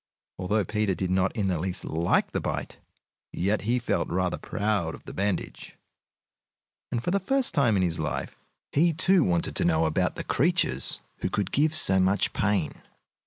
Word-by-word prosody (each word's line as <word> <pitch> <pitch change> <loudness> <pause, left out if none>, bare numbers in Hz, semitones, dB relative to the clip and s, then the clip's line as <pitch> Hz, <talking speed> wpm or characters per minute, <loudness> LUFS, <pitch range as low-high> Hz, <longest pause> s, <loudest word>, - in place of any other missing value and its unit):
Although 100 +2 0
Peter 105 -1 -1
did 95 0 -2
not 95 0 +2
in 105 -4 -1
the 90 -4 0
least 90 +1 -3
like 80 +2 +1
the - - -2
bite, - - -4 0.5
yet 100 +5 0
he 120 +4 0
felt 120 - -1
rather 90 0 -1
proud 100 -6 -1
of - - -16
the - - -8
bandage, 100 0 -3 1.2
and 120 - -2
for 175 - -1
the 200 - +2
first 265 +7 +1
time 120 -7 +3
in 95 - +2
his 85 -2 -1
life 75 -4 -3 0.4
he, 165 +3 +3
too, 180 +2 +5
wanted 85 -2 0
to - - +2
know 80 -1 +2
about 80 - 0
the - - -5
creatures 150 - +1 0.2
who - - -2
could 100 -2 -2
give 155 +2 +2
so 95 -9 +5
much 95 +2 +1
pain. 100 -6 -1
100 Hz, 180 wpm, -26 LUFS, 90-125 Hz, 1.2 s, too